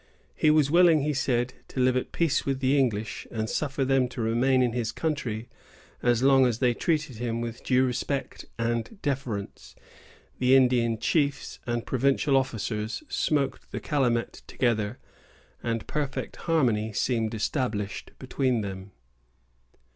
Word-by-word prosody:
He 155 Hz, -, +2 dB
was 150 Hz, -2 st, +4 dB
willing, 170 Hz, -3 st, +6 dB
he 150 Hz, +2 st, 0 dB
said, 125 Hz, -2 st, 0 dB
to -, -, -6 dB
live 130 Hz, 0 st, +3 dB
at 130 Hz, -, -2 dB
peace 165 Hz, -4 st, +1 dB
with 135 Hz, -1 st, -1 dB
the 135 Hz, +1 st, +2 dB
English, 115 Hz, -6 st, -1 dB
and 110 Hz, -1 st, -3 dB
suffer 135 Hz, +2 st, -1 dB
them 135 Hz, -1 st, +3 dB
to 125 Hz, -, -9 dB
remain 125 Hz, +3 st, +2 dB
in 120 Hz, -2 st, 0 dB
his 120 Hz, -2 st, -1 dB
country 125 Hz, -8 st, -3 dB, 0.5 s
as 120 Hz, 0 st, +2 dB
long 135 Hz, -1 st, +6 dB
as 120 Hz, -3 st, -1 dB
they 125 Hz, -1 st, +2 dB
treated 155 Hz, -2 st, -1 dB
him 115 Hz, 0 st, -2 dB
with 115 Hz, 0 st, -5 dB
due 130 Hz, 0 st, +3 dB
respect 130 Hz, +2 st, -3 dB
and 115 Hz, -, -2 dB
deference. 130 Hz, -8 st, -4 dB, 0.6 s
The 130 Hz, +1 st, +5 dB
Indian 125 Hz, -3 st, +3 dB
chiefs 140 Hz, +3 st, 0 dB
and 120 Hz, -1 st, -1 dB
provincial 135 Hz, +2 st, +2 dB
officers 115 Hz, -, -1 dB
smoked 140 Hz, -3 st, -1 dB
the -, -, -3 dB
calumet 125 Hz, -6 st, 0 dB
together, 115 Hz, -2 st, 0 dB, 0.6 s
and 115 Hz, -2 st, -2 dB
perfect 145 Hz, -3 st, -3 dB
harmony 115 Hz, -9 st, +2 dB
seemed 115 Hz, 0 st, 0 dB
established 105 Hz, -4 st, -2 dB
between 130 Hz, -4 st, 0 dB
them. 95 Hz, -1 st, -7 dB
125 Hz, 145 wpm, -27 LUFS, 115-135 Hz, 0.6 s, willing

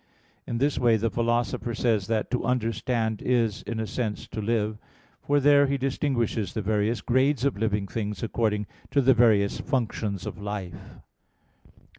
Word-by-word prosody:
In 115 Hz, -, -2 dB
this 140 Hz, +4 st, +1 dB
way 120 Hz, -2 st, +4 dB
the 110 Hz, +1 st, -1 dB
Philosopher 120 Hz, 0 st, -1 dB
says 110 Hz, -6 st, +1 dB
that 110 Hz, -1 st, -1 dB
to 125 Hz, -, 0 dB
understand 115 Hz, -2 st, -1 dB
is, 115 Hz, -4 st, +1 dB
in 115 Hz, +1 st, -4 dB
a 110 Hz, -, -1 dB
sense, 110 Hz, -1 st, -3 dB
to 110 Hz, -, -4 dB
live: 110 Hz, -1 st, -1 dB, 0.4 s
for 145 Hz, 0 st, +2 dB
there 145 Hz, 0 st, +5 dB
he 140 Hz, 0 st, 0 dB
distinguishes 130 Hz, -5 st, -1 dB
the 110 Hz, -, -1 dB
various 110 Hz, +3 st, 0 dB
grades 130 Hz, +1 st, +2 dB
of 140 Hz, -, +1 dB
living 105 Hz, -1 st, 0 dB
things 105 Hz, 0 st, -4 dB
according 105 Hz, -2 st, 0 dB, 0.2 s
to 145 Hz, -, +2 dB
the 135 Hz, 0 st, +5 dB
various 110 Hz, -4 st, +3 dB
functions 110 Hz, -, -2 dB
of -, -, -6 dB
life. 95 Hz, -3 st, -6 dB
115 Hz, 160 wpm, -26 LUFS, 105-125 Hz, 0.4 s, there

